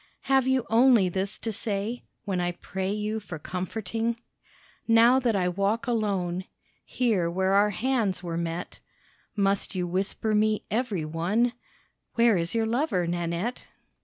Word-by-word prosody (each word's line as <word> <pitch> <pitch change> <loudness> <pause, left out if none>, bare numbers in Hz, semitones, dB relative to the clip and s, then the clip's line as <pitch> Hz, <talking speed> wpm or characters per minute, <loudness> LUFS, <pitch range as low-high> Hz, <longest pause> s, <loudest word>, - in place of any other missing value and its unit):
Have 265 -1 +2
you 260 -2 +2
only 230 -4 +5
this 195 +3 -2
to 225 - -4
say 210 +3 -3 0.2
When 190 -3 -1
I 175 0 -1
pray 190 +2 -4
you 210 +1 -2
for 185 -6 -7
comforting? 220 +7 -3 0.7
Now 230 +3 +6
that 240 -4 +1
I 185 -2 +1
walk 200 +7 0
alone 195 -7 -1 0.4
Here 210 -9 0
where 190 +2 +1
our 205 +1 +5
hands 220 -4 0
were 170 -1 -3
met, 170 +1 -4 0.6
Must 200 -1 0
you 180 -1 0
whisper 195 +4 -1
me 215 0 +2
every 215 -8 -1
one, 190 +10 +1 0.6
"Where 235 -2 +5
is 170 +3 -2
your 225 -1 +2
lover, 225 - 0
Nanette?" 175 +7 -2
205 Hz, 145 wpm, -27 LUFS, 180-230 Hz, 0.7 s, Now